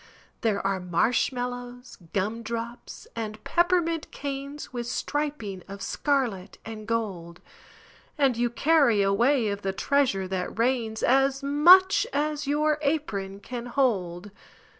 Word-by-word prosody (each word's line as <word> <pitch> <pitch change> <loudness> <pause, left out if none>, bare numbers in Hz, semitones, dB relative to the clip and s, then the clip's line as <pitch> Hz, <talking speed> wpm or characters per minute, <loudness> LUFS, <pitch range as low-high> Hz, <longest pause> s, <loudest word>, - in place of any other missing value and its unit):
There 210 -4 0
are 195 -1 +1
marshmallows, 245 +6 -2
gumdrops, 230 +4 -4
and 215 -2 -5
peppermint 345 -2 +1
canes 280 0 -6
With 240 -1 -4
striping 280 -9 -3
of 200 0 -8
scarlet 240 -10 -1
and 220 -1 -8
gold, 190 -7 -3 0.8
And 275 -4 +3
you 240 +1 +1
carry 270 -5 +3
away 230 +4 +2
of 200 0 -3
the 195 -1 -2
treasure 245 -6 +1
that 185 +1 -4
rains, 230 -2 0
As 270 +2 +3
much 350 +7 +6
as 295 0 -1
your 300 +1 +1
apron 205 -10 -2
can 245 +2 -6
hold! 205 -8 -1
240 Hz, 120 wpm, -26 LUFS, 205-280 Hz, 0.8 s, much